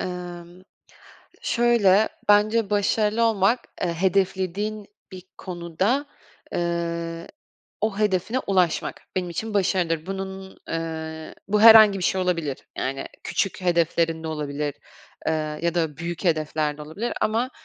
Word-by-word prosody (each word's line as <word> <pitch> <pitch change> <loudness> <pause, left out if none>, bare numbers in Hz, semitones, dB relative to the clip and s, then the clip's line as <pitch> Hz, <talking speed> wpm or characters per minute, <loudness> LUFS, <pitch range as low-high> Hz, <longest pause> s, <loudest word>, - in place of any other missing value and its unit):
Emm. 175 0 -7 0.8
Şöyle, 220 -4 +4 0.2
bence 210 +1 +4
başarılı 210 +2 +1
olmak, 225 +2 +3 0.2
eee, 175 -2 0
hedeflediğin 190 +3 0 0.3
bir 185 - -8 0.2
konuda, 185 - -1 0.5
eee, 170 -1 -2 0.5
o 215 -2 0
hedefine 210 +3 +1
ulaşmak, 185 -4 0
benim 180 -1 -1
için 215 +6 -4
başarıdır. 180 -4 +1
Bunun, 190 0 -6
eee, 160 -1 -5
bu 210 +1 +2
herhangi 220 -3 +9
bir 180 - -3
şey 190 - +1
olabilir. 165 -7 -1 0.2
Yani 135 +1 -2 0.2
küçük 195 - -1
hedeflerin 165 -2 +1
de - - -3
olabilir, 150 -2 -3 0.5
eee, 160 - +2 0.3
ya 170 0 0
da 160 -4 -1
büyük 175 +2 -5
hedefler 155 -2 0
de - - -7
olabilir 175 +11 -4
ama 230 +4 +1
180 Hz, 120 wpm, -24 LUFS, 165-205 Hz, 0.8 s, herhangi